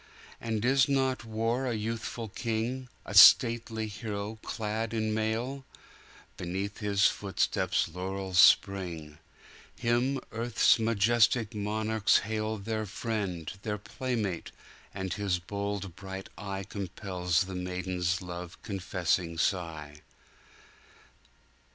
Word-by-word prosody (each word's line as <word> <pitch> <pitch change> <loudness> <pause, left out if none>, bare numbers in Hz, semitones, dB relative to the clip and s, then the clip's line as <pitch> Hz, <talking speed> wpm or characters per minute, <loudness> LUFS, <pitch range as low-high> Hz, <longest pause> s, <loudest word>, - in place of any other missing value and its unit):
And 110 -1 -2
is 135 +1 +4
not 130 -3 +1
war 115 +4 -1
a 120 - -1
youthful 115 +1 -4
king,A 120 +4 -4
stately 115 -1 +7
hero 105 0 -5
clad 110 +1 -3
in 110 -1 0
mail? 115 +5 -2 0.7
Beneath 95 +2 -4
his 100 -2 +2
footsteps 100 -2 +1
laurels 95 +2 -2
spring; 85 -6 +4 0.6
Him 120 +3 +1
earth's 115 +1 +3
majestic 115 0 +3
monarchs 110 +1 +1
hailTheir 110 0 -2
friend, 100 -6 -3
their 105 -1 -2
playmate! 105 -3 -3 0.4
and 95 -2 -4
his 100 -3 0
bold 100 0 -4
bright 95 0 -7
eyeCompels 95 -2 -2
the 95 - -7
maiden's 90 -1 -2
love 90 0 -7
confessing 90 -5 -1
sigh. 80 -5 -2
105 Hz, 95 wpm, -29 LUFS, 95-115 Hz, 0.7 s, stately